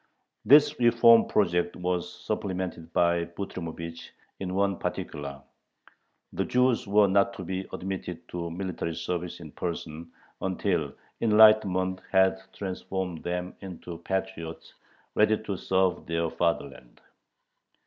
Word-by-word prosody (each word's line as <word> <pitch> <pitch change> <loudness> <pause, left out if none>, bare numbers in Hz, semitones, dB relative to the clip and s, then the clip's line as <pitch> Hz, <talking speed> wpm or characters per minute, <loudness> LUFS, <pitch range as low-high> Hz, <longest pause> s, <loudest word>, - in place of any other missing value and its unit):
This 145 +5 +6
reform 115 -1 +6
project 90 -4 +1
was 90 -1 -2
supplemented 90 -3 -3
by 85 0 +2
Butrymovich 85 -2 -7 0.3
in 95 -1 -3
one 100 -1 +1
particular: 70 -2 -5 0.9
the - - 0
Jews 125 -3 +2
were 100 0 +5
not 100 +1 +3
to 95 - -6
be 95 +2 -4
admitted 90 -3 -5
to 85 -1 -4
military 85 -2 -4
service 85 +1 -4
in 80 -3 -10
person, 85 -1 -5 0.3
until 90 -5 -1 0.3
enlightenment 105 -4 +5
had 95 0 +4
transformed 95 -3 -4
them 90 +1 -3
into 90 -3 -8
patriots 95 -3 -4 0.4
ready 105 +1 +4
to 105 -2 -4
serve 95 0 0
their 85 0 -1
fatherland. 85 -7 -2
90 Hz, 115 wpm, -27 LUFS, 85-100 Hz, 0.9 s, This